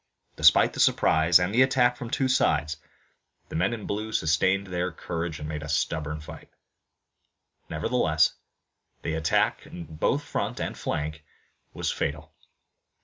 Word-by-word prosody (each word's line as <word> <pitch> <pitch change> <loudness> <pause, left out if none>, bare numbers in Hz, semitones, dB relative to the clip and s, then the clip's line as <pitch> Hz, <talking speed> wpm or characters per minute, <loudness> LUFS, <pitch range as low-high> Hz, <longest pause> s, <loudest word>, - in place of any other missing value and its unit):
Despite - - +5
the - - -7
surprise 80 +2 +4
and 90 +3 -1
the 125 - +4
attack 130 -2 +3
from 120 - -7
two 135 +2 0
sides, 80 - +1 0.7
the - - -7
men 90 +6 +1
in 115 -3 -5
blue 110 +2 -3
sustained 95 +3 +1
their 90 -1 -2
courage 85 -1 -4
and 75 - -6
made 75 -1 -4
a 80 - -7
stubborn 75 0 -1
fight. 75 - -11 1.2
Nevertheless 80 -3 +1 0.7
the 80 - -2
attack 80 0 0
in 85 - -8
both 80 -1 -1
front - - -3
and - - -3
flank 75 +1 -4 0.5
was - - -1
fatal. 75 +1 -4
80 Hz, 145 wpm, -26 LUFS, 75-100 Hz, 1.2 s, Despite